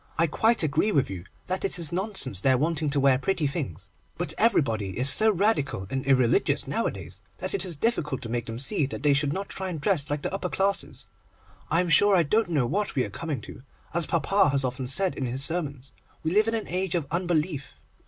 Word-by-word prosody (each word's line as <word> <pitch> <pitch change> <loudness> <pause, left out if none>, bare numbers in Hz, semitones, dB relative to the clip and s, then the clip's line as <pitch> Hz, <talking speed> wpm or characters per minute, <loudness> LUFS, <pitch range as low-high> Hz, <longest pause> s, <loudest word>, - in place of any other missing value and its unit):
I 165 - +4
quite 220 +7 +2
agree 155 +8 +1
with 140 - +1
you 90 -2 -7 0.2
that 185 +1 -3
it 195 - +1
is 165 -4 +3
nonsense 175 - +2
their 130 +2 +3
wanting 155 +1 0
to 140 0 0
wear 135 -2 +3
pretty 170 0 -1
things, 140 - -5 0.3
but 155 - -2
everybody 115 - +1
is 130 +2 +5
so 220 +10 +7
Radical 180 - 0
and 135 0 -2
irreligious 130 -3 +2
nowadays, 95 0 -4 0.2
that 185 +1 -4
it 195 -2 0
is 175 -5 -3
difficult 150 - -1
to 115 - -6
make 120 0 -2
them 115 -1 -6
see 135 +2 +1
that 140 - -7
they 145 -1 +4
should 140 0 0
not 195 +5 -4
try 190 -1 -4
and 165 -4 -5
dress 150 -3 0
like 145 0 -3
the - - -3
upper 195 -2 -3
classes. 195 +2 -1 0.6
I 165 +3 +3
am 180 - -2
sure 200 +6 +5
I 175 - +4
don't 215 +7 +1
know 145 -7 +1
what 195 - -2
we 130 - +1
are 100 - -8
coming 150 -1 -4
to. - - -11 0.3
As 170 -1 -1
papa 190 +3 +2
has 135 -1 0
often 125 0 -4
said 185 +8 0
in 130 - -3
his 130 +3 -3
sermons, 140 -5 -4 0.3
we 160 - -1
live 210 +4 +3
in 225 - 0
an 220 - -4
age 185 0 -1
of 165 -4 -1
unbelief. 165 -4 -2
150 Hz, 225 wpm, -26 LUFS, 130-185 Hz, 0.6 s, so